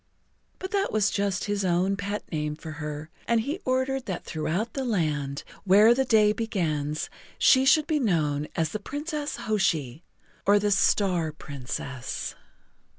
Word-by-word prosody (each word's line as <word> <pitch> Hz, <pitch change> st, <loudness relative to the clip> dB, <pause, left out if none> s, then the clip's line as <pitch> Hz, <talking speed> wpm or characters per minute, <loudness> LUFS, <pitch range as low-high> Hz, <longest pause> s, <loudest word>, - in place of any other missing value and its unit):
But 375 Hz, -, -6 dB
that 400 Hz, -1 st, 0 dB
was 215 Hz, -1 st, +2 dB
just 200 Hz, -2 st, 0 dB
his 205 Hz, -1 st, -1 dB
own 185 Hz, +2 st, +2 dB
pet 205 Hz, +1 st, -3 dB
name 150 Hz, -2 st, -2 dB
for 160 Hz, 0 st, -8 dB
her, 150 Hz, +1 st, -5 dB, 0.2 s
and 230 Hz, -1 st, +3 dB
he 295 Hz, -, -3 dB
ordered 260 Hz, 0 st, 0 dB
that 185 Hz, -3 st, -4 dB
throughout 175 Hz, +8 st, -2 dB
the 270 Hz, -, -2 dB
Land 150 Hz, -, -1 dB, 0.2 s
Where 205 Hz, +4 st, +7 dB
the 265 Hz, +2 st, +1 dB
Day 215 Hz, -3 st, +4 dB
Begins 155 Hz, -9 st, -2 dB, 0.3 s
she 260 Hz, 0 st, +5 dB
should 300 Hz, +2 st, +5 dB
be 310 Hz, -2 st, +1 dB
known 150 Hz, -, +1 dB
as 160 Hz, -2 st, +1 dB
the 215 Hz, -, -4 dB
Princess 295 Hz, +5 st, -4 dB
Hoshi, 165 Hz, -, -1 dB, 0.4 s
or 205 Hz, +1 st, +5 dB
the 205 Hz, 0 st, +1 dB
Star 185 Hz, -4 st, +2 dB
Princess. 135 Hz, -3 st, -5 dB
195 Hz, 150 wpm, -26 LUFS, 155-235 Hz, 0.4 s, Where